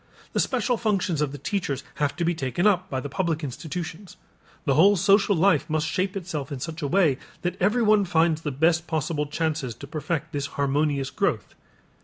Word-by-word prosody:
The - - +1
special 250 -2 +1
functions 195 -8 0
of 150 -2 0
the 145 - -7
teachers 140 -3 -2
have 145 -1 0
to 170 - -1
be 175 - +2
taken 140 - -2
up 185 -3 +3
by 130 - -2
the 145 - -5
public 165 0 -1
institutions. 170 +6 -6 0.5
The 140 - +3
whole 195 +9 +6
social 200 +2 +4
life 165 -3 +3
must 155 0 0
shape 185 +4 -1
itself 160 -7 -5
in 140 - -4
such 165 +4 -5
a 145 - -1
way 160 -5 +3 0.2
that 175 0 -1
everyone 210 0 +4
finds 165 -2 +2
the 150 - -2
best 160 +4 +2
possible 155 -1 -1
chances 150 -6 -2
to 140 - -9
perfect 155 +2 -3
this 140 -1 -2
harmonious 140 -1 0
growth. - - -1
160 Hz, 190 wpm, -25 LUFS, 145-185 Hz, 0.5 s, whole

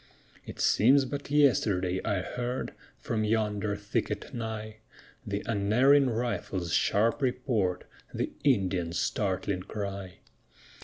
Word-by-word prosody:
It - - -9
seems 135 +5 +4
but 140 +2 -5
yesterday 100 -11 +2
I 100 -2 0
heard, 125 +7 -4 0.2
From 110 -1 -2
yonder 105 -1 0
thicket 105 +1 -3
nigh, 110 -2 -5 0.5
The 100 0 -2
unerring 125 +7 +4
rifle's 110 -7 -2
sharp 115 +7 +2
report, 125 -8 0 0.3
The - - -2
Indian's 95 - +1
startling 95 -1 -1
cry. 100 -2 -6
105 Hz, 105 wpm, -29 LUFS, 100-125 Hz, 0.5 s, seems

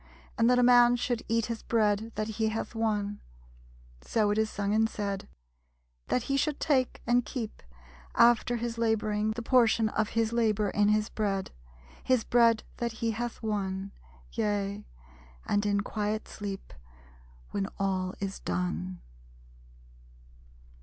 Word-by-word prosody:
And 230 -1 +3
that 250 - +4
a 250 - +4
man 245 0 +7
should 245 -1 -1
eat 230 0 +1
His 230 -1 -4
bread 220 -1 +1
that 215 - -2
he 220 0 -1
hath 225 +2 -4
won; 210 -2 -1 0.8
(So 210 -2 +1
is 210 - 0
it 220 - +3
sung 205 -1 -2
and 220 +1 +3
said), 200 -2 -4 0.8
That 250 - +1
he 275 +2 0
should 295 +1 0
take 265 -5 +1
and 245 +1 +3
keep, 230 -5 -5 0.5
After 240 +1 +5
his 235 0 -3
laboring, 215 -2 +1
The 235 +1 -5
portion 230 -3 +4
of 215 0 0
his 225 0 +2
labor 215 -3 +1
in 205 0 +3
his 215 +1 +2
bread, 195 -3 -2 0.5
His 255 -3 +2
bread 230 -2 +4
that 235 -1 -2
he 225 +1 -1
hath 235 +1 -4
won; 195 -2 -2 0.4
Yea, 205 - -2 0.6
and 205 0 +1
in 200 0 +2
quiet 210 +1 -2
sleep, 200 -2 -7 0.8
When 195 -1 -1
all 190 -1 -1
is 195 -1 -4
done. 90 0 -3
215 Hz, 145 wpm, -29 LUFS, 205-235 Hz, 0.8 s, man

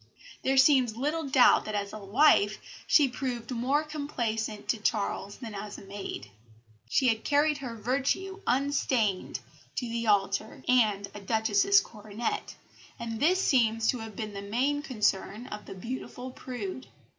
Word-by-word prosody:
There 270 0 +1
seems 260 -4 +5
little 300 +4 -1
doubt 265 -2 +5
that 215 - -4
as 200 -1 -3
a 215 - -6
wife 210 0 +4 0.3
she 295 -3 +6
proved 245 -2 -4
more 260 +5 +1
complaisant 235 -8 -3
to 235 - +2
Charles 205 -1 -1
than 230 -4 -8
as 205 +1 -6
a - - -11
maid. 195 - -7 0.6
She 255 - +3
had 220 -1 0
carried 295 0 +2
her 250 -4 -6
virtue 275 - -1
unstained 255 -6 0 0.3
to 245 - -2
the 230 0 -3
altar 205 +1 +1
and 215 -5 +3
a 205 - -7
Duchess's 220 - +3
coronet, 215 +1 -5 0.4
and 230 -1 -5
this 360 +7 +3
seems 225 -8 +2
to 250 - +1
have 220 -2 -8
been 215 0 -5
the 200 - -5
main 255 +8 0
concern 215 -4 -1
of 210 -4 -8
the - - -8
beautiful 250 +4 -6
prude. 250 -2 -6
235 Hz, 155 wpm, -29 LUFS, 210-270 Hz, 0.6 s, she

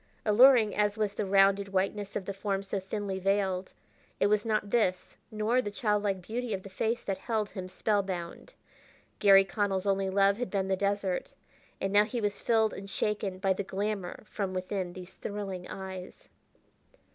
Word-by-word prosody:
Alluring 230 0 +6
as 210 0 +1
was 210 -2 0
the 205 - -2
rounded 195 +1 +4
whiteness 195 +1 -1
of 190 - -3
the 200 - -3
form 195 0 -2
so 195 0 -3
thinly 190 0 -4
veiled, 190 -1 0 0.5
it - - +3
was 210 +2 +2
not 215 -2 0
this 185 -6 0
nor 220 +4 +1
the 210 - -4
childlike 205 -3 0
beauty 230 +2 -3
of 190 - -8
the 195 - -10
face 225 +4 -1
that 195 -1 -3
held 220 -3 -2
him 185 -2 -6
spellbound. 190 -4 -2 0.6
Garry 195 -1 +7
Connell's 195 -1 -1
only 195 -1 +1
love 195 +1 +3
had 245 0 -3
been 195 -2 -1
the 190 - +3
desert, 200 -1 -1 0.4
and 195 0 -2
now 205 +1 +7
he 235 +3 -3
was 205 -2 -1
filled 220 -2 +2
and 195 0 -8
shaken 200 -2 -1
by 190 0 +2
the 190 - -3
glamour 200 -1 -3
from 195 -3 -4
within 185 -1 -3
these 185 0 -10
thrilling 195 -3 -5
eyes. 190 -1 -8
200 Hz, 175 wpm, -30 LUFS, 190-210 Hz, 0.6 s, Garry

